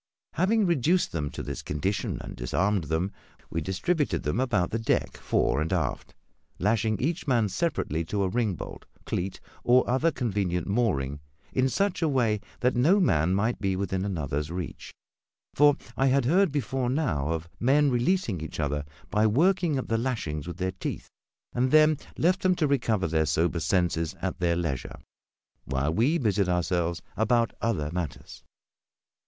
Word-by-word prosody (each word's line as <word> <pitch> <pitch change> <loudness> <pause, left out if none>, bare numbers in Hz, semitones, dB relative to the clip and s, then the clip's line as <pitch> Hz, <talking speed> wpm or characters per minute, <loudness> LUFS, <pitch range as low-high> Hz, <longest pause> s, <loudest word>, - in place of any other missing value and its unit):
Having 210 +4 +2
reduced 170 +1 +2
them 75 -3 -2
to - - -6
this - - -5
condition, 95 +7 -2
and - - -8
disarmed 95 +9 0
them, 80 +6 -1 0.4
we 80 - -1
distributed 135 - -1
them 75 +10 -1
about 120 -9 +1
the 115 - -1
deck 110 - 0
fore 75 - +1
and 80 - -2
aft, - - -2 0.4
lashing 110 +2 +1
each 160 +4 -2
man 120 -5 +3
separately 100 - -1
to 100 +4 -1
a - - +1
ringbolt, 105 -2 -3 0.2
cleat, 95 +2 -3 0.2
or 125 +1 +4
other 130 +7 +2
convenient 100 - -1
mooring 90 - 0 0.3
in 130 0 +2
such 195 +3 0
a 160 - +2
way 115 -6 +2 0.2
that 125 +1 +2
no 160 +12 +4
man 90 - +2
might 110 +5 0
be 95 -2 0
within 95 0 -2
another's 75 -6 -2
reach 90 -1 -6 0.6
for 145 0 +5 0.2
I 135 +3 +2
had 135 -1 +3
heard 180 +5 +3
before 130 -2 -1
now 105 - 0
of 80 0 -2
men 140 +4 +3
releasing 120 - +1
each 80 - -6
other 75 -1 -1 0.3
by 105 +1 +3
working 165 - +2
at 130 - -3
the 115 0 +1
lashings 85 - -3
with 85 -1 -6
their 95 0 -1
teeth 95 - -5 0.4
and 125 +1 +1
then 155 0 +5 0.2
left 185 +3 +2
them 185 -1 +3
to 165 - +1
recover 115 - +1
their 80 -1 +1
sober 85 +4 +1
senses 85 0 0
at - - -3
their 85 -1 +2
leisure, 80 -7 -3 0.7
while 70 +3 -1
we 130 - +2
busied 100 - +1
ourselves 85 -1 0
about 115 0 +2
other 85 -10 -1
matters. 85 -4 -5
105 Hz, 165 wpm, -27 LUFS, 85-135 Hz, 0.7 s, for